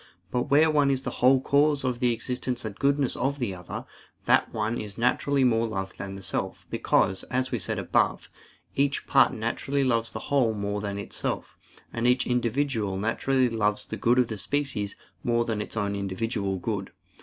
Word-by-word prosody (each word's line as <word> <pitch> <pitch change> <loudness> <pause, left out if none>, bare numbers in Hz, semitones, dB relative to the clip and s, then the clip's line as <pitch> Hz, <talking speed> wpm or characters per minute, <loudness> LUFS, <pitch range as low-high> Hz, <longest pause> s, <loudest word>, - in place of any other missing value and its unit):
But 125 +2 -1
where 155 +3 +5
one 145 -2 +3
is 135 -1 0
the - - -3
whole 130 +2 +6
cause 145 +1 +3
of 125 -2 -1
the 125 -1 +3
existence 125 +1 -3
and 110 - -4
goodness 140 +3 +1
of 135 +3 -1
the 120 -8 -2
other, 90 -1 -7 0.4
that - - +3
one 110 +2 -1
is 105 -1 -8
naturally 130 +3 +2
more 115 -2 +3
loved 95 -3 -5
than 95 0 -6
self; - - -3
because, 95 0 +2
as 130 +1 -1
we 120 - -1
said 90 - -2
above, - - +1 0.5
each 140 0 +1
part 135 - +5
naturally 130 +4 -1
loves 115 -3 +1
the - - -5 0.2
whole 120 -6 +3
more 100 0 -2
than 100 -1 -3
itself: 100 - -4 0.4
and 115 +1 0
each 125 +1 +3
individual 120 -4 0
naturally 125 +5 +1
loves 105 -3 0
the - - -5
good 120 +2 +2
of 125 -2 +4
the 110 -2 -5
species 135 -5 -1 0.3
more 120 -1 +2
than 110 -2 -1
its 110 - -6
own 100 -1 0
individual 100 0 -2
good. 100 0 -3
120 Hz, 185 wpm, -27 LUFS, 105-130 Hz, 0.5 s, whole